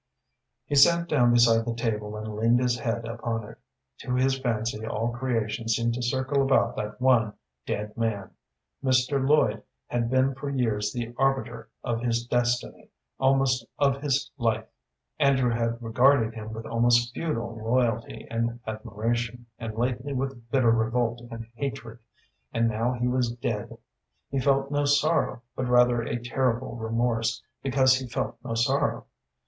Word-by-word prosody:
He - - -5
sat 170 +4 +5
down 125 -7 +3
beside 115 -1 +5
the 115 0 -3
table 105 -2 -2
and 110 0 -6
leaned 115 +3 +3
his 125 -1 +1
head 115 0 -2
upon 115 -1 -3
it. - - -13 0.4
To 125 - -2
his 130 +1 +2
fancy 115 -3 -2
all 110 +1 -2
creation 115 -3 -2
seemed 115 +1 +1
to 125 - -3
circle 130 +3 0
about 135 0 +2
that 105 +1 -4
one 120 -5 +3 0.3
dead 105 0 -3
man. 110 -4 -2 0.5
Mr. 130 +1 +2
Lloyd 135 -7 +3 0.2
had 120 -1 -1
been 130 +1 +2
for 140 +2 -5
years 110 -6 0
the 120 0 -4
arbiter 135 0 0
of 115 -2 -2
his 120 -1 0
destiny, 120 0 -1 0.3
almost 135 -2 +3
of 140 -1 +2
his 140 -2 0
life. 110 -2 0 0.5
Andrew 130 -3 +3
had 115 0 -1
regarded 120 0 +3
him 110 -1 -7
with 110 0 -7
almost 120 +1 +2
feudal 120 -9 -3
loyalty 115 -1 0
and 115 +1 -1
admiration, 115 +2 -3
and 115 -2 -5
lately 125 +3 -1
with 130 -3 -4
bitter 125 -2 +3
revolt 115 +1 0
and 115 -1 -7
hatred, 125 -3 -5 0.5
and 115 0 +2
now 115 +3 0
he 125 0 -1
was 125 -1 0
dead. 120 - -4 0.5
He 135 - 0
felt 135 +1 +1
no 145 0 +1
sorrow, 145 -3 +2
but 130 - -2
rather 125 -1 +4
a 115 - -2
terrible 125 +1 -1
remorse 115 0 -1 0.2
because 130 -1 +3
he 130 - -6
felt 120 - -3
no 115 - -3
sorrow. 115 +1 +1
120 Hz, 155 wpm, -26 LUFS, 115-130 Hz, 0.5 s, sat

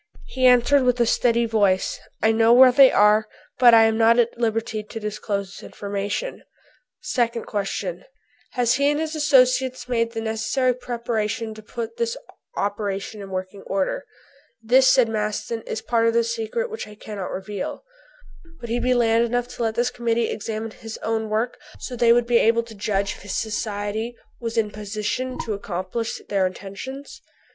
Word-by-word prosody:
He 260 -1 +2
answered 250 +3 +5
with 250 -1 +1
a 235 - +4
steady 235 0 +2
voice, 205 -4 +1 0.2
"I 220 - +5
know 225 +1 +4
where 255 +1 +8
they 270 +1 +7
are, 210 +1 +4 0.3
but 240 -2 +8
I 225 - +7
am 225 0 +2
not 230 +1 +5
at 235 -1 +2
liberty 225 -1 -1
to 210 +2 -8
disclose 210 -2 -3
this - - -11
information." 205 - -4 0.6
Second 235 -2 -1
question: 195 -3 -3 0.5
"Have 245 -2 +2
he 280 +2 +2
and 295 0 0
his 315 0 -3
associates 255 -3 +3
made 230 -2 0
the 225 - -3
necessary 225 +3 0
preparations 230 -2 -3
to - - -9
put 235 - -6
this 470 +1 -1 0.4
operation 205 0 -3
in 195 - -8
working 185 +1 -5
order?" 195 -1 -2 0.5
"This," 250 +4 +4
said 255 -2 +5
Maston, 215 +1 -3
"is 220 - -3
a - - -29
part 230 -1 +2
of 230 - +1
the 235 - +4
secret 230 - -3
which 445 - -6
I 210 - -12
cannot 205 -3 -6
reveal." 195 - -5 0.8
"Would 235 -1 -7
he 240 - +1
be 250 +1 +2
man 230 -1 +3
enough 245 +1 -1
to 245 - -8
let 225 -1 0
this 245 +1 +1
Committee 235 -1 0
examine 220 +1 -4
his 225 0 -9
own 220 -1 -1
work, 220 +3 -1 0.2
so 250 - -6
they 235 -1 +4
would 240 0 +4
be 240 0 +3
able 230 +1 +3
to 230 -1 -12
judge 200 -1 -2
if - - -16
his 205 - -5
Society 215 +1 -3 0.2
would 230 -1 -4
be 225 - +4
in 210 -1 -7
position 215 +5 -3
to 220 - -2
accomplish 200 +3 -4
their 195 -2 +1
intentions?" 200 +9 -8
225 Hz, 180 wpm, -23 LUFS, 210-245 Hz, 0.8 s, where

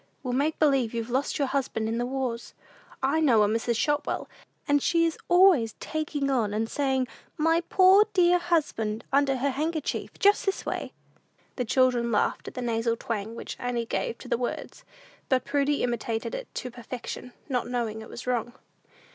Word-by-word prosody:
We'll 250 -2 -2
make 290 +5 +1
believe 270 -7 +2
you've 230 +1 -3
lost 265 +3 0
your 280 - +1
husband 260 -5 -1
in 225 +1 -1
the 245 - -1
wars. 255 -3 -3 0.5
I 280 +4 +2
know 245 -9 +5
a - - +3
Mrs. 225 +2 0
Shotwell, 295 +3 0 0.4
and 290 -1 +3
she 335 +1 +3
is 330 - 0
always 350 - +5
taking 295 -3 -2
on, 220 -6 +1
and 225 +1 0
saying, 265 -1 0 0.3
'My 325 +2 +3
poor 385 +3 +6
dear 355 -2 +4
husband,' 285 -11 -1
under 275 -1 +3
her 275 +2 0
handkerchief; 310 +3 -3
just 405 +1 +4
this 390 - -1
way." - - -3 0.6
The 250 - -2
children 245 -1 +2
laughed 210 - 0
at - - -8
the 250 - -3
nasal 230 0 0
twang 225 -1 -4
which - - -7
Annie 245 -1 -2
gave 230 - -2
to - - -11
the - - 0
words, 245 - -4 0.5
and 260 -1 +2
Prudy 285 0 +1
imitated 235 - -2
it - - -5
to 250 - -4
perfection, 245 +1 -7
not 255 -4 -1
knowing 235 -3 -2
it 220 - -11
was 240 - -8
wrong. 240 -1 -1
255 Hz, 180 wpm, -27 LUFS, 235-300 Hz, 0.6 s, poor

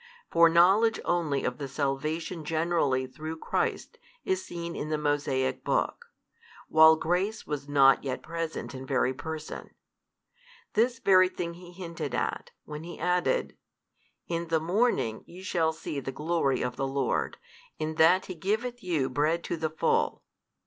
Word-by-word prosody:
For 170 0 +6
knowledge 195 +7 +5
only 160 -6 0
of 125 - -2
the 140 - -4
salvation 155 +5 -2
generally 155 -4 +1
through 155 +5 -7
Christ 475 - -2 0.3
is 190 0 0
seen 170 0 -6
in 150 - -4
the 155 - 0
Mosaic 145 -3 0
book, - - -1 0.6
while 160 0 +7
grace 180 +7 -1
was 145 -1 -5
not 135 -2 +5
yet 135 -2 -4
present 165 -2 -4
in 130 0 -8
very 130 -1 +1
person. 155 +3 -7 1.0
This 240 +3 +2
very 185 -3 +5
thing 170 -2 -4
He 175 +1 -12
hinted 175 -2 -5
at, - - -2 0.2
when 150 +1 -7
He 170 0 -8
added, 180 - 0 0.7
In 170 0 -2
the 165 -1 +2
morning 175 - +1
ye 180 +2 -11
shall 165 -3 +1
see 155 -2 -5
the 135 - -5
glory 150 -2 0
of 125 0 -3
the 135 - -1
Lord, 135 -1 -1 0.4
in 155 0 -2
that 180 +4 +5
He 185 - -6
giveth 220 +8 -2
you 165 -9 0
bread 150 +6 0
to - - -2
the 160 -1 -2
full. 155 - 0
160 Hz, 155 wpm, -28 LUFS, 145-175 Hz, 1.0 s, while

